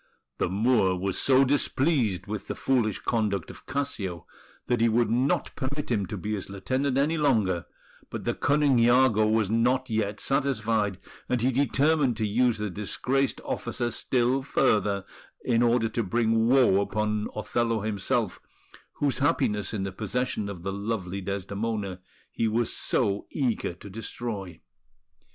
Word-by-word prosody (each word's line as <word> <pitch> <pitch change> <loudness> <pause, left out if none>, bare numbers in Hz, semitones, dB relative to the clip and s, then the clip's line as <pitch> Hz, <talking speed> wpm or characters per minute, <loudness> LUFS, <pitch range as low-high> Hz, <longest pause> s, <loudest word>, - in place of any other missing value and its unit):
The - - +1
Moor 100 -1 +2
was 95 +1 -2
so 135 0 +5
displeased 130 - +1
with 105 -1 -5
the - - -3
foolish 115 -6 +1
conduct 105 -6 -1
of - - -15
Cassio 120 - -3 0.4
that 120 -2 0
he 115 - +4
would 115 +1 +2
not 125 +4 +1
permit 140 +1 -4
him 100 -5 0
to 105 - -5
be 105 +4 -3
his 100 -2 -4
lieutenant 130 +8 -1
any 155 +4 +2
longer; 110 - +1 0.4
but - - -5
the - - 0
cunning 145 -2 +2
Iago 120 -2 +4
was 110 -2 +1
not 125 +2 +1
yet 105 -2 -1
satisfied, 115 -8 0 0.3
and 125 - +1
he 130 +3 +2
determined 140 0 +2
to 110 - 0
use 120 +2 +2
the 105 -2 -3
disgraced 125 +8 -1
officer 120 -1 -2
still 125 +2 +1
further, 105 -7 +1 0.4
in 120 -2 +2
order 120 -1 +3
to 115 - -1
bring 115 +2 +1
woe 125 -6 +5
upon 105 0 -1
Othello 115 +1 0
himself, 110 +1 -1 0.5
whose 140 -2 0
happiness 115 - +1
in 105 -3 -2
the 100 - -3
possession 110 +1 -2
of 90 -4 -8
the 95 0 -3
lovely 100 -2 -3
Desdemona 100 0 -3 0.3
he 115 - 0
was 115 +1 0
so 100 -4 -1
eager 125 - -1
to 90 +4 -13
destroy. 100 -3 -6
115 Hz, 150 wpm, -27 LUFS, 100-130 Hz, 0.5 s, so